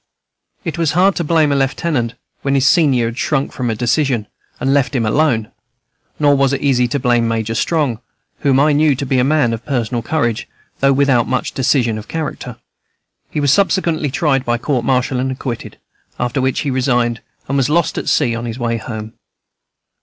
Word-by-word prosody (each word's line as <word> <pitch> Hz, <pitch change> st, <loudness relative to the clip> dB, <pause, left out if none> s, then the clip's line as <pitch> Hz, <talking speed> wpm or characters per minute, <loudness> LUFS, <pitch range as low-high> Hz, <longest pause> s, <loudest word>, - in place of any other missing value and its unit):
It 170 Hz, -2 st, -4 dB
was 160 Hz, -3 st, +1 dB
hard 185 Hz, +3 st, +3 dB
to 170 Hz, -, 0 dB
blame 155 Hz, -2 st, +2 dB
a -, -, +2 dB
lieutenant 135 Hz, -3 st, -1 dB, 0.3 s
when 140 Hz, 0 st, 0 dB
his 135 Hz, -1 st, +2 dB
senior 135 Hz, -7 st, +4 dB
had 115 Hz, +2 st, -4 dB
shrunk 140 Hz, -3 st, 0 dB
from 125 Hz, -2 st, -3 dB
a 110 Hz, -, -1 dB
decision, 125 Hz, -1 st, 0 dB, 0.3 s
and 135 Hz, +1 st, +1 dB
left 135 Hz, -2 st, +1 dB
him 120 Hz, -3 st, +1 dB
alone; 115 Hz, -3 st, +1 dB, 0.7 s
nor 145 Hz, -1 st, +4 dB
was 140 Hz, -1 st, +2 dB
it 140 Hz, -, -2 dB
easy 125 Hz, -3 st, +2 dB
to 140 Hz, +3 st, -2 dB
blame 120 Hz, -2 st, +2 dB
Major 115 Hz, -1 st, -1 dB
Strong, 140 Hz, -2 st, 0 dB, 0.4 s
whom 135 Hz, -2 st, +2 dB
I 150 Hz, +2 st, +4 dB
knew 150 Hz, -1 st, +3 dB
to 140 Hz, -, -4 dB
be 130 Hz, -1 st, +1 dB
a -, -, +3 dB
man 140 Hz, -4 st, +2 dB
of 115 Hz, -, -5 dB
personal 120 Hz, -4 st, -2 dB
courage 120 Hz, -3 st, -1 dB, 0.3 s
though 135 Hz, 0 st, +4 dB
without 135 Hz, -4 st, +3 dB
much 130 Hz, 0 st, -1 dB
decision 120 Hz, -4 st, +1 dB
of 110 Hz, -, -11 dB
character. 150 Hz, -7 st, -5 dB, 0.7 s
He -, -, -3 dB
was 145 Hz, -1 st, +3 dB
subsequently 170 Hz, -5 st, +1 dB
tried 135 Hz, -1 st, +1 dB
by 120 Hz, -2 st, 0 dB
court 125 Hz, 0 st, -1 dB
martial 130 Hz, 0 st, +1 dB
and 130 Hz, +1 st, -1 dB
acquitted, 130 Hz, -2 st, -6 dB, 0.4 s
after 120 Hz, +2 st, -1 dB
which 130 Hz, 0 st, 0 dB
he 145 Hz, -, -2 dB
resigned, 125 Hz, -2 st, 0 dB, 0.3 s
and 135 Hz, -, -2 dB
was 135 Hz, -1 st, +2 dB
lost 170 Hz, +1 st, +1 dB
at -, -, -3 dB
sea 125 Hz, -6 st, +2 dB
on 115 Hz, +1 st, -4 dB
his 115 Hz, 0 st, -5 dB
way 115 Hz, -2 st, -1 dB
home. 110 Hz, -1 st, -7 dB
130 Hz, 195 wpm, -17 LUFS, 120-145 Hz, 0.7 s, senior